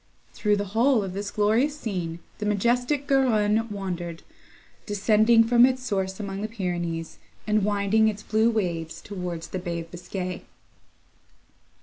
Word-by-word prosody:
Through 210 -1 +1
the 205 0 -2
whole 235 0 +3
of 190 -2 -5
this 200 +1 -4
glorious 225 +9 +1
scene 175 - -4 0.2
the 210 - -3
majestic 245 +7 +1
Garonne 225 -5 +2
wandered; 180 -4 -5 0.6
descending 215 +2 +4
from 240 +1 +5
its 255 0 +3
source 190 -4 -2
among 195 -1 -4
the 215 - -2
Pyrenees, 175 -6 -4 0.3
and 215 -1 +2
winding 205 +2 +2
its 210 -1 -2
blue 220 +2 +2
waves 170 -7 -2
towards 180 -4 -6
the 185 - -3
Bay 170 -2 -3
of 165 - -12
Biscay. 180 +1 -5
205 Hz, 140 wpm, -25 LUFS, 180-225 Hz, 0.6 s, from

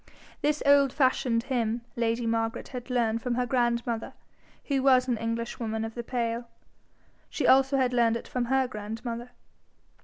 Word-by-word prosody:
This 300 0 0
old 280 -1 +5
fashioned 255 -4 +1
hymn 235 -3 -1
lady 230 0 0
Margaret 225 0 -1
had 250 -1 -7
learned 230 -2 +1
from 245 0 -1
her 250 0 0
grandmother, 235 -2 -1 0.5
who 275 -2 0
was 260 -1 +4
an 245 - +1
Englishwoman 230 -1 -3
of 225 - -6
the 235 - -4
pale. 235 -1 -2 0.8
She - - -2
also 270 +1 +5
had 255 -2 +1
learned 230 -2 +3
it - - -10
from 250 -1 -2
her 265 +1 +2
grandmother. 230 +2 -6
240 Hz, 155 wpm, -28 LUFS, 230-255 Hz, 0.8 s, old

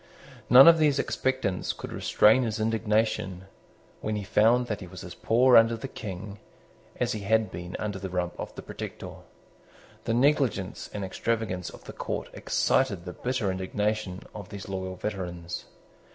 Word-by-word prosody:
None 130 +4 +10
of 165 -1 +8
these 150 -3 +3
expectants 130 -9 -1
could - - -8
restrain 110 +5 +4
his 110 -3 -2
indignation, 110 -4 0 0.5
when 110 - -2
he 105 - -3
found 110 +4 +3
that 105 -3 -3
he 90 - -7
was - - -10
as - - -8
poor 125 +2 +4
under 115 0 +6
the 125 - -6
King 100 -3 -7 0.6
as - - +1
he 110 - -2
had 110 0 +1
been 90 +1 -7
under 105 -2 -4
the 95 0 -5
Rump 90 -1 -2
or - - -3
the - - -8
Protector. - - -7 0.9
The 115 - 0
negligence 130 -7 +1
and 100 -2 -4
extravagance 95 -3 -2
of - - -13
the - - -9
court - - -4
excited 100 -10 +1
the 90 - -6
bitter 125 -6 -1
indignation 95 +1 -2
of 100 -2 -8
these 100 -2 -8
loyal 95 -1 -4
veterans. 90 -4 -5
105 Hz, 165 wpm, -27 LUFS, 95-115 Hz, 0.9 s, None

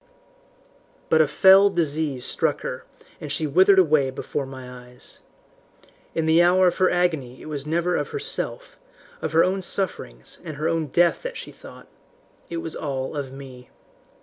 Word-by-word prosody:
"But 160 - +5
a 155 - +3
fell 195 +5 +6
disease 155 -7 -2
struck - - -1
her, - - -6 0.3
and 150 - -7
she 155 +2 -1
withered 190 +7 +5
away 155 -7 +4
before 135 +1 -4
my 125 -2 -10
eyes. 125 0 -11 1.0
In 165 - 0
the 160 +2 +5
hour 180 +2 +4
of 180 - +2
her 185 -1 +3
agony 160 -8 -1
it - - -12
was 150 -2 -5
never 170 +3 0
of - - -1
herself, - - -3 0.4
of - - -3
her 165 - +5
own 190 +1 0
sufferings 170 - -4
and 155 -4 -7
her 155 +2 -1
own 165 -2 -1
death 175 +5 +2
that - - -6
she - - -8
thought. - - -14 0.6
It 170 - -4
was 165 -1 -5
all 135 -1 -4
of 140 -3 -4
me. 130 -2 -12
160 Hz, 170 wpm, -23 LUFS, 135-180 Hz, 1.0 s, fell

